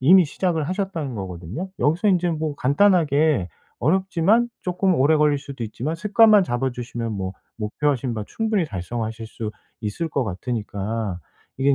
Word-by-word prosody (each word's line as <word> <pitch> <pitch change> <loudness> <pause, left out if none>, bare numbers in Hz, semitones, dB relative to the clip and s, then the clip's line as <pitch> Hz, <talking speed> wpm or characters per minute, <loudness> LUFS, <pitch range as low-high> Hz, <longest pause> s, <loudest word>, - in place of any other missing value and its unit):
이미 180 +7 +7
시작을 165 +1 -1
하셨다는 180 - -3
거거든요. 95 - -5
여기서 165 +8 +2
인제 180 -2 +3
뭐 155 -2 -2
간단하게 150 - +3 0.3
어렵지만 190 +6 +2
쪼끔 180 +1 +1
오래 150 +2 +4
걸릴 150 -1 +3
수도 140 -3 -8
있지만 125 +8 -3
습관만 210 +3 +5
잡아주시면 120 -4 -3
뭐 95 -2 -3 0.3
목표하신 125 +3 -1
바 105 -2 -4
충분히 220 -5 0
달성하실 110 - -4
수 110 -1 -5 0.3
있을 110 +11 -3
것 140 -4 0
같으니까 105 -1 -3 0.4
이게 140 +1 +4
145 Hz, 355 characters per minute, -23 LUFS, 115-180 Hz, 0.4 s, 이미